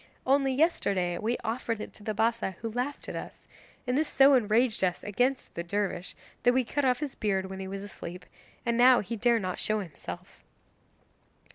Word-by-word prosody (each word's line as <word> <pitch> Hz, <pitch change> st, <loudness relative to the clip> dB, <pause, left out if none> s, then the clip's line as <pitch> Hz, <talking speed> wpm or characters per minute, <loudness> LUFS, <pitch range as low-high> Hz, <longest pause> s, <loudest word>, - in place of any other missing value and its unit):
Only 270 Hz, 0 st, +3 dB
yesterday 200 Hz, -, +1 dB
we 230 Hz, +3 st, 0 dB
offered 230 Hz, -1 st, -2 dB
it -, -, -7 dB
to 210 Hz, -, -13 dB
the 215 Hz, 0 st, -2 dB
Bassa, 220 Hz, -3 st, 0 dB
who 225 Hz, -, -2 dB
laughed 250 Hz, +5 st, -3 dB
at -, -, -5 dB
us, -, -, -8 dB, 0.4 s
and 250 Hz, 0 st, 0 dB
this 310 Hz, +2 st, +2 dB
so 275 Hz, +1 st, +6 dB
enraged 230 Hz, -2 st, +2 dB
us 180 Hz, -1 st, 0 dB
against 250 Hz, +6 st, 0 dB
the 170 Hz, -, -3 dB
dervish 190 Hz, 0 st, -2 dB, 0.3 s
that 245 Hz, -, +4 dB
we 260 Hz, -, +3 dB
cut 285 Hz, +4 st, -2 dB
off 250 Hz, +1 st, +2 dB
his 290 Hz, -3 st, -3 dB
beard 190 Hz, -2 st, -1 dB
when 190 Hz, -, -6 dB
he 190 Hz, -, -5 dB
was 195 Hz, +1 st, -5 dB
asleep, 180 Hz, -3 st, -8 dB, 0.4 s
and 235 Hz, -1 st, +1 dB
now 250 Hz, 0 st, +7 dB
he 225 Hz, +4 st, -4 dB
dare 235 Hz, +2 st, +3 dB
not 185 Hz, -4 st, -3 dB
show 215 Hz, 0 st, 0 dB
himself. 145 Hz, -, -8 dB
225 Hz, 190 wpm, -29 LUFS, 195-250 Hz, 0.4 s, now